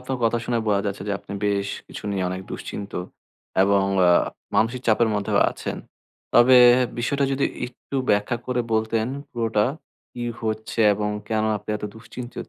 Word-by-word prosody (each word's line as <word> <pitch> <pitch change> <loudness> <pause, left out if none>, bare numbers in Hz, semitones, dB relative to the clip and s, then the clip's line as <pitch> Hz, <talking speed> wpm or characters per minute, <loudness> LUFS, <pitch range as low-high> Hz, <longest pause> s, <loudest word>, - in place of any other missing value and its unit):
আপনার 130 0 -4
কথা 115 +1 +2
শুনে 120 0 0
বোঝা 100 -2 +2
যাচ্ছে 100 -1 -3
যে, - - 0
আপনি - - -11
বেশ 100 -1 0 0.2
কিছু - - -9
নিয়ে 95 -2 -1
অনেক 95 +1 -4
দুশ্চিন্ত। 100 -1 -6 0.7
এবং 100 0 +3 0.2
আ - - +6 0.5
মানসিক 115 +3 +2
চাপের 115 +1 +4
মধ্যেও 105 -1 0
আছেন। - - -5 0.6
তবে 125 +2 +7 0.4
বিষয়টা 140 +3 +1
যদি 135 +1 +1 0.2
একটু 130 +2 -8
ব্যাখ্যা 105 +4 +1
করে 125 -1 0
বলতেন 110 0 +1 0.2
পুরোটা, 115 -3 +1 0.5
কি 120 - -6 0.2
হচ্ছে 110 +1 -2
এবং 105 +1 -2 0.2
কেন 110 -1 +1
আপনি 105 - -7
এত 105 - -7
দুশ্চিন্তিত 120 +2 -8
110 Hz, 160 wpm, -23 LUFS, 105-120 Hz, 0.7 s, তবে